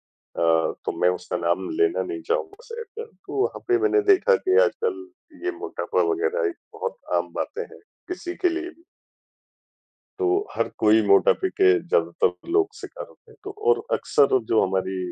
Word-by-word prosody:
हूँ। 80 -1 0
अ, - - -11
तो - - 0
मैं 90 - +5
उसका 90 0 -4
नाम 85 - -1
लेना 410 -3 +2
नहीं 365 -2 -5
चाहूँगा 455 -2 -2
शहर 465 0 -7
का, 455 +2 -9
तो 455 - -14
वहाँ 465 - -3
पे 370 - +4
मैंने 420 +1 +3
देखा 475 +5 +4
कि 385 -1 +1
आजकल 430 -6 -2 0.4
ये 365 - +1
मोटापा 425 - -2
वगैरह 455 +3 0
एक 350 - -8 0.2
बहुत 480 - -4 0.2
आम - - -1
बातें 460 - -3
हैं, 460 - -15 0.3
किसी 360 0 -5
के 360 - +1
लिए 350 +1 -3
भी। 335 -1 -19 1.4
तो, 385 +2 +1
हर - - 0
कोई 110 +1 +5
मोटापे 100 - +4
के 385 0 +4
ज़्यादातर 460 -5 0
लोग 405 +3 +2
शिकार - - -8
होते 455 - -22
हैं। - - -18
तो 405 - -6 0.2
और 445 -2 +4
अक्सर 140 -2 +3
जो 110 - +5
हमारी 95 0 -1
385 Hz, 180 wpm, -24 LUFS, 335-450 Hz, 1.4 s, मैं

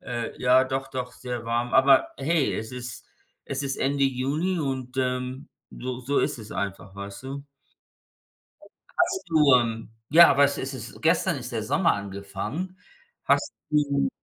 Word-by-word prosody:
äh, 120 -2 -4
ja, 130 +1 +5
doch-doch, 130 -1 -3
sehr 125 -2 -6
warm. 120 +1 -1
Aber 135 0 +6
hey, 150 +1 +1
es 110 +1 -4
is-t 125 -2 -8 0.4
es 140 +1 -3
ist 135 -1 -2
Ende 140 +1 +1
Juni 145 +7 0
und, 130 -2 -3
ähm, 125 +2 -2 0.2
so 125 0 -5
so 140 +3 0
ist - - -1
es 110 -2 -9
einfach, 100 -1 -4
weißt 100 +4 -8
du. 140 +1 -6 1.5
Hast 360 +2 +1
du, 150 -5 +5
ähm, 115 -2 -1 0.2
ja, 170 +3 +9
aber 140 +1 +5
es 140 0 +1
ist 135 +1 -4
es 130 - -9
gestern - - +2
ist - - -8
der - - -2
Sommer - - +2
angefangen. 100 - -5 0.5
Hast - - +2 0.2
du 145 - +2
130 Hz, 155 wpm, -26 LUFS, 120-140 Hz, 1.5 s, ja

